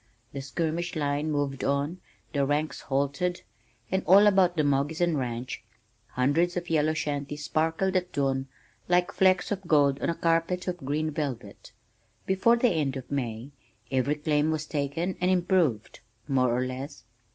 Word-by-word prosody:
The 140 - -4
skirmish 165 +5 -2
line 145 0 -1
moved 145 -3 -1
on, 145 +6 -1 0.3
the 140 -2 +1
ranks 145 +2 -1
halted, 140 +6 -1 0.5
and 190 0 +1
all 195 +3 +8
about 190 -4 +4
the 155 - +3
Moggeson 150 +4 +1
ranch 125 -1 -4 0.5
hundreds 160 +8 +1
of 175 -1 -4
yellow 155 0 +2
shanties 150 -1 -3
sparkled 160 +6 0
at 180 -1 0
dawn 135 -2 -1 0.4
like 180 0 +2
flecks 185 +1 +2
of 200 -1 -1
gold 140 -3 +3
on - - 0
a 170 - 0
carpet 165 +3 0
of 180 -1 -2
green 155 +1 -2
velvet. 145 -5 -5 0.5
Before 190 +5 +3
the 240 +1 +3
end 150 -7 0
of 130 - -9
May 125 -1 -3 0.4
every 135 +2 +1
claim 150 0 +1
was 155 -1 -1
taken 155 +5 -2
and 180 - +2
"improved" 175 - +1 0.3
more 130 -2 +2
or 125 +2 0
less. 130 +2 -6
150 Hz, 155 wpm, -27 LUFS, 140-175 Hz, 0.5 s, all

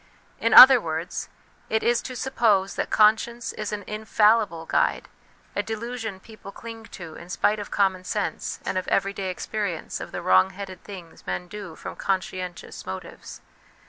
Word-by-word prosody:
In 230 - +1
other 260 -2 +11
words, 160 0 -4 0.4
it 220 - 0
is 240 0 +2
to 255 - -7
suppose 220 -7 +1
that - - -3
conscience 220 +2 +2
is 215 -1 -5
an 210 -1 -4
infallible 210 -4 +2
guide, - - +1 0.5
a - - +1
delusion 225 -2 -5
people 215 -1 -12
cling 225 +1 -9
to 170 -7 -10
in 170 - -11
spite 210 +3 +1
of 205 - -6
common 190 -2 +1
sense 205 +2 -3
and 185 - 0
of 185 - -8
everyday 195 -1 0
experience 185 -2 -4
of - - -7
the - - -5
wrong 95 0 +5
headed 190 -3 -8
things 180 -5 -11
men 180 - -3
do 195 -4 -8
from - - -8
conscientious 185 -2 -4
motives. 95 0 -8
200 Hz, 160 wpm, -25 LUFS, 185-220 Hz, 0.5 s, other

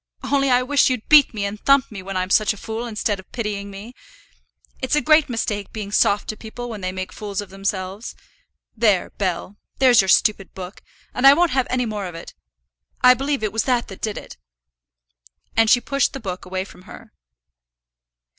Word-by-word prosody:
Only 275 -1 +1
I 250 0 +3
wish 280 +1 +3
you'd 250 -4 -3
beat 300 -3 +7
me 205 -3 -3
and 200 +1 -5
thump 275 +1 +3
me 200 -3 -7
when 190 0 -5
I'm 185 +1 -2
such 215 +1 +3
a - - -13
fool, 225 +3 -5
instead 210 -2 -2
of 190 - -15
pitying 210 -4 -4
me. 200 +5 -10 0.9
It's 260 +2 0
a - - +4
great 305 +1 +4
mistake 210 -4 -3
being 210 -2 -6
soft 205 0 +2
to 215 - -3
people 240 +3 -8
when 215 -3 -7
they 185 0 -2
make 185 0 -6
fools 205 -2 -5
of 205 -2 -6
themselves. 195 +1 -4 0.6
There, 210 -5 +2
Bell; 190 +1 -3 0.2
there's 255 -4 +6
your 190 - -4
stupid 195 0 +2
book, 185 +1 -9 0.3
and 255 +2 +4
I 275 - +9
won't 345 +1 +2
have 260 -1 +1
any 250 -1 0
more 210 -4 -4
of 175 - -9
it. 165 - -10 0.7
I 250 0 +8
believe 275 -1 -2
it 210 -2 -2
was 225 - 0
that 245 -2 0
that 195 - -11
did 215 -2 -3
it." - - -10 1.2
And 225 -1 +4
she 245 - +6
pushed 275 +2 0
the 270 - -5
book 185 -5 -6
away 185 0 -3
from 190 - -15
her. - - -13
215 Hz, 200 wpm, -21 LUFS, 195-250 Hz, 1.2 s, I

